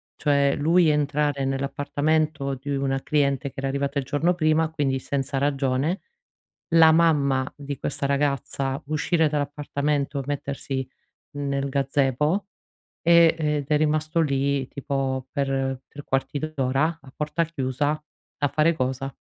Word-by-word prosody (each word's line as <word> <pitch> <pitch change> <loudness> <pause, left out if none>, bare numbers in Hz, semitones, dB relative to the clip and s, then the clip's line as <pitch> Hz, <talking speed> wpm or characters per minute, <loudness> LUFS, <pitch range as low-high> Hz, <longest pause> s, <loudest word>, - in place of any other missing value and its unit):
cioè 140 -2 +2
lui 165 +4 +4
entrare 145 -1 +1
nell'appartamento 145 +2 0
di 140 +2 -5
una 135 -1 -1
cliente 140 -2 +1
che - - -23
era 135 - -1
arrivata 140 +1 -1
il 135 - -4
giorno 155 +6 +1
prima, 160 -1 +2
quindi 140 -4 0
senza 135 +1 -2
ragione, 140 +4 0 0.7
la 160 -1 +7
mamma 140 -5 +3
di 140 -1 -6
questa 140 0 -2
ragazza 140 0 -1
uscire 155 +2 +1
dall'appartamento, 145 -1 -1
mettersi 140 -2 -3 0.5
nel 140 -1 -1
gazebo, 140 +6 +1 0.6
ehm, 170 -1 +6
ed 150 -2 0
è 150 - +4
rimasto 155 +2 +1
lì 140 -2 0
tipo 135 -2 -2
per 135 -2 -1
3 145 -1 -10
quarti 135 +2 -1
d'ora, 155 +1 0
a 135 - -15
porta 150 +3 0
chiusa, 145 0 -1 0.4
a 145 - +1
fare 155 +4 +2
cosa? 130 +1 -2
140 Hz, 130 wpm, -24 LUFS, 135-155 Hz, 0.7 s, la